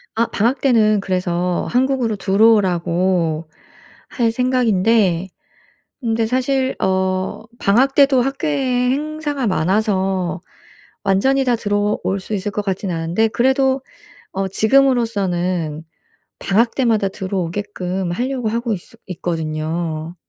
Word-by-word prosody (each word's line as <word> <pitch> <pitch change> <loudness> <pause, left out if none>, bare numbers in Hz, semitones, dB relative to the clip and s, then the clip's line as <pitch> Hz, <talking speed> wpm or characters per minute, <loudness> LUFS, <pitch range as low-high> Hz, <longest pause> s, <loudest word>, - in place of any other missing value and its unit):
아 230 - +2
방학때는 230 -3 +2
그래서 180 -2 -1
한국으로 255 -3 +1
들어오라고 185 -5 +2 0.6
할 230 -3 0
생각인데 225 -7 +2 0.7
근데 225 -1 0
사실 260 +2 0
어 190 +1 -1 0.2
방학때도 270 +5 +4
학교에 270 -2 0
행사가 295 -2 -2
많아서 190 -1 0 0.6
완전히 265 +8 +2
다 245 -2 +2
들어올 205 -2 -1
수 210 - -5
있을 205 +1 -2
것 205 +1 -3
같지는 190 -2 -2
않은데 170 +7 0
그래도 265 +4 +1 0.5
어 195 0 -2
지금으로서는 190 - +1 0.6
방학 230 +4 +1
때마다 225 -6 +2
들어오게끔 185 -1 -3
하려고 245 +3 -2
하고 235 0 -1
있어 200 +4 -9
있거든요. 160 -1 -3
205 Hz, 260 characters per minute, -19 LUFS, 185-250 Hz, 0.7 s, 방학때도